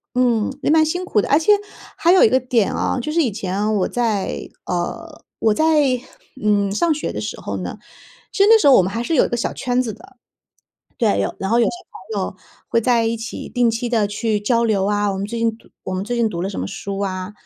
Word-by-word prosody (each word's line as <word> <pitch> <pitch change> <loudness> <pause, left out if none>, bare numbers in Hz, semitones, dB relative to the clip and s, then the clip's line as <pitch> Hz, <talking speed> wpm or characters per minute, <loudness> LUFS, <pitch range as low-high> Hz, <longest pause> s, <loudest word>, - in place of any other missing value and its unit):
嗯， 240 -4 +2
也 - - +2
蛮 315 0 +5
辛 355 +4 -2
苦 215 - +1
的。 - - -4
而 285 - +4
且 325 +6 +3 0.5
还 345 - +4
有 375 - +6
一 - - +6
个 260 - +3
点 245 -5 +1
啊， - - -1
就 305 - -4
是 335 - +2
以 260 - +1
前 205 +1 -2
我 195 - +1
在 225 -5 -2 0.2
呃， 300 - -4
我 220 -2 +3
在， 315 - +1 0.8
嗯， 205 -2 +2
上 320 +10 +2
学 300 - -3
的 - - -5
时 - - -5
候 - - -4
呢， - - -5 0.5
其 395 - -1
实 400 - +6
那 450 - +8
时 440 - -1
候 270 - +8
我 - - +6
们 180 - -1
还 230 +4 -3
是 325 - -1
有 - - +5
一 - - -1
个 240 - -2
小 235 - -2
圈 250 0 -1
子 230 -3 -3
的。 225 +4 -16 0.8
对， 220 -4 +2
有 - - -2
然 195 - -2
后 230 - +3
有 - - +4
些 - - 0 0.5
朋 - - 0
友 - - -4 0.3
会 230 - +1
在 235 -1 +2
一 230 - 0
起 225 0 -7
定 240 -2 +1
期 230 +2 -2
地 225 -4 +1
去 210 0 -1
交 235 +2 +2
流 200 -4 +1
啊， 205 0 +1
我 190 - -4
们 195 - -2
最 230 +3 -5
近 230 -1 +1
读 - - -23
我 185 - -4
们 185 - -2
最 240 +3 -3
近 230 - +2
读 170 -2 -4
了 190 - -2
什 200 - -5
么 - - -3
书 195 0 -5
啊， 185 0 -3
225 Hz, 275 characters per minute, -20 LUFS, 205-250 Hz, 0.8 s, 那